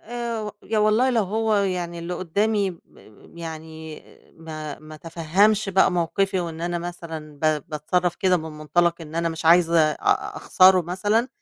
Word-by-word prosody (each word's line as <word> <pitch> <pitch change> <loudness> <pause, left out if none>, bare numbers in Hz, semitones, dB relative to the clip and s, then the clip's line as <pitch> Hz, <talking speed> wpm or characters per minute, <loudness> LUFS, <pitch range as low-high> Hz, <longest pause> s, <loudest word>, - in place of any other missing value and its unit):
آآ 230 -2 -4
يا 220 - -1
والله 215 +5 +3
لو 235 -3 +2
هو 220 +3 0
يعني 180 -3 -1
اللي 170 +1 -4
قُدّامي 200 +3 0
ب 170 - -12 0.6
يعني 160 -1 -8 0.3
ما 155 -2 -7
ما 155 0 -12
تفهّمش 175 +7 +1
بقى 190 -1 +3
موقِفي 185 +2 0
وإن 165 -2 -5
أنا 175 0 -2
مثلًا 165 -3 -8
ب 155 -1 +1
باتصرّف 175 +3 -1
كده 185 -1 +2
من 160 -1 -6
مُنطلَق 170 +3 +1
إن 160 -1 -10
أنا 170 0 0
مش 165 0 -6
عايزة 170 0 +5
أ - - -1
أخسَره 185 0 +5
مثلًا، 205 +8 0
175 Hz, 160 wpm, -23 LUFS, 160-195 Hz, 0.6 s, عايزة